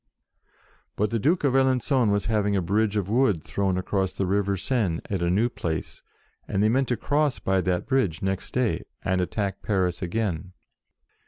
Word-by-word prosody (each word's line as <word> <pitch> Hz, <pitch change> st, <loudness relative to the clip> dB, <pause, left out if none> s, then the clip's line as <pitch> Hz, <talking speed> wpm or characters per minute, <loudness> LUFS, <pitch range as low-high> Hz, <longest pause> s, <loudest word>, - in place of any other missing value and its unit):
But 105 Hz, +1 st, 0 dB
the 115 Hz, -, 0 dB
Duke 160 Hz, -, +2 dB
of 140 Hz, -3 st, +2 dB
Alen^on 130 Hz, -2 st, +3 dB
was 100 Hz, 0 st, +1 dB
having 105 Hz, -2 st, +1 dB
a 95 Hz, -, +2 dB
bridge 105 Hz, +3 st, +1 dB
of 100 Hz, -3 st, -1 dB
wood 105 Hz, -, +2 dB
thrown 95 Hz, -2 st, -1 dB
across 95 Hz, 0 st, -1 dB
the 95 Hz, -, -1 dB
river 100 Hz, +1 st, +1 dB
Seine, 95 Hz, -6 st, 0 dB
at 95 Hz, -3 st, -1 dB
a 85 Hz, -, +1 dB
new 105 Hz, +7 st, +3 dB
place, 80 Hz, -9 st, -4 dB, 0.5 s
and 100 Hz, +1 st, 0 dB
they 110 Hz, -, +4 dB
meant 130 Hz, +3 st, +2 dB
to 120 Hz, -, 0 dB
cross 145 Hz, +2 st, +1 dB
by 95 Hz, -1 st, +1 dB
that 90 Hz, 0 st, -1 dB
bridge 125 Hz, -, 0 dB
next 95 Hz, -1 st, -2 dB
day, 125 Hz, -3 st, +1 dB, 0.2 s
and 95 Hz, 0 st, +1 dB
attack 100 Hz, +1 st, -2 dB
Paris 95 Hz, -4 st, 0 dB
again. 90 Hz, -2 st, -2 dB
100 Hz, 180 wpm, -25 LUFS, 95-120 Hz, 0.5 s, they